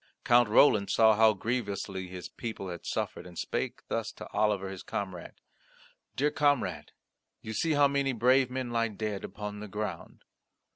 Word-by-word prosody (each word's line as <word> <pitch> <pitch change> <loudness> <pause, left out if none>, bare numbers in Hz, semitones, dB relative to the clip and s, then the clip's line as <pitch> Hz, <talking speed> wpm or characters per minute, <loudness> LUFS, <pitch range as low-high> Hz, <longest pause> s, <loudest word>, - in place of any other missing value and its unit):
Count 120 -2 +5
Roland 105 -3 +5
saw 110 -1 +5
how 110 0 +5
grievously 100 -4 -3
his 90 0 -7
people 110 -5 -6
had 85 -1 -7
suffered - - -3
and 90 -2 -13
spake - - -3
thus - - -2
to - - -9
Oliver 100 -3 +1
his 95 - -7
comrade: 95 -4 -5 0.8
"Dear 145 +3 +1
comrade, 120 - 0 0.5
you 110 - -5
see 160 +8 +1
how 145 -1 +5
many 140 -1 0
brave 125 +2 +3
men 130 -1 -4
lie 115 -1 +1
dead 105 -1 -4
upon 105 0 -6
the 105 - -7
ground. 105 +1 -6
110 Hz, 160 wpm, -29 LUFS, 100-125 Hz, 0.8 s, Count